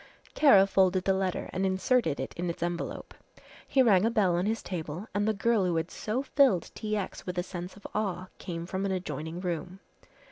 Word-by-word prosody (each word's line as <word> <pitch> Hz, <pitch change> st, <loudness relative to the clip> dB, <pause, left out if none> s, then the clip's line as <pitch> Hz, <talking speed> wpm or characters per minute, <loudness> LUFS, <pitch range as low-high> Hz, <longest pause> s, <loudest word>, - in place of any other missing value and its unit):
Kara 205 Hz, -11 st, +7 dB
folded 190 Hz, -1 st, +2 dB
the 195 Hz, -, +2 dB
letter 190 Hz, -1 st, -1 dB
and 185 Hz, -, -1 dB
inserted 190 Hz, -, +1 dB
it 130 Hz, -, -4 dB
in 175 Hz, +1 st, -2 dB
its 170 Hz, -, -4 dB
envelope. 175 Hz, 0 st, -4 dB, 0.5 s
He 265 Hz, -, +4 dB
rang 200 Hz, -6 st, +5 dB
a 225 Hz, -, +3 dB
bell 205 Hz, -7 st, +2 dB
on 180 Hz, +3 st, 0 dB
his 225 Hz, +1 st, -1 dB
table 170 Hz, +2 st, -5 dB
and 205 Hz, +1 st, 0 dB
the -, -, +4 dB
girl 225 Hz, 0 st, +2 dB
who 180 Hz, -2 st, +1 dB
had 165 Hz, +1 st, -1 dB
so 235 Hz, +5 st, -2 dB
filled 265 Hz, -, +3 dB
T. 215 Hz, -1 st, -2 dB
X. 195 Hz, -2 st, -5 dB
with 180 Hz, 0 st, -4 dB
a 175 Hz, -, +1 dB
sense 180 Hz, 0 st, -7 dB
of 200 Hz, -, -17 dB
awe 190 Hz, -3 st, -2 dB
came 170 Hz, -2 st, -5 dB
from 190 Hz, +2 st, -3 dB
an -, -, -1 dB
adjoining 160 Hz, -2 st, -4 dB
room. 180 Hz, +1 st, -4 dB
190 Hz, 210 wpm, -29 LUFS, 175-210 Hz, 0.5 s, Kara